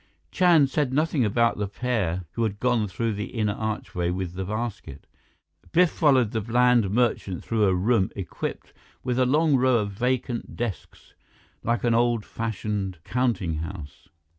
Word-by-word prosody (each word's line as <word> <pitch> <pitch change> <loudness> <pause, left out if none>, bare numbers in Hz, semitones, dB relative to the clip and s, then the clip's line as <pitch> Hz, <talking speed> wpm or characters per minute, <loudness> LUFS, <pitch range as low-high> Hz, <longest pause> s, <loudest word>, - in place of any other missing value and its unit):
Chand 165 -7 +4
said 145 -4 0
nothing 150 -1 +1
about 115 +1 +2
the 105 - -1
pair 100 -6 -1
who 115 - -4
had 105 -3 -1
gone 120 -3 +1
through 110 +4 -2
the 105 0 -3
inner 105 -2 0
archway 105 -5 -3
with 90 -1 -3
the 95 +1 -4
basket. 110 +3 -5 0.7
Biff 180 0 +5
followed 130 -8 +3
the 110 - -1
bland 120 -1 +3
merchant 105 -5 0
through 110 -2 +1
a 95 -2 +3
room 100 +1 +2
equipped 95 -4 -5 0.3
with 125 0 -1
a 130 - +3
long 150 +1 +3
row 130 -1 +3
of 105 -2 -1
vacant 125 +2 -2
desks, 115 -5 -6 0.5
like 120 +1 -1
an 120 -1 +3
old 120 -2 +2
fashioned 105 -4 -3
counting 115 -10 -1
house. 80 -2 -8
115 Hz, 160 wpm, -25 LUFS, 100-125 Hz, 0.7 s, Biff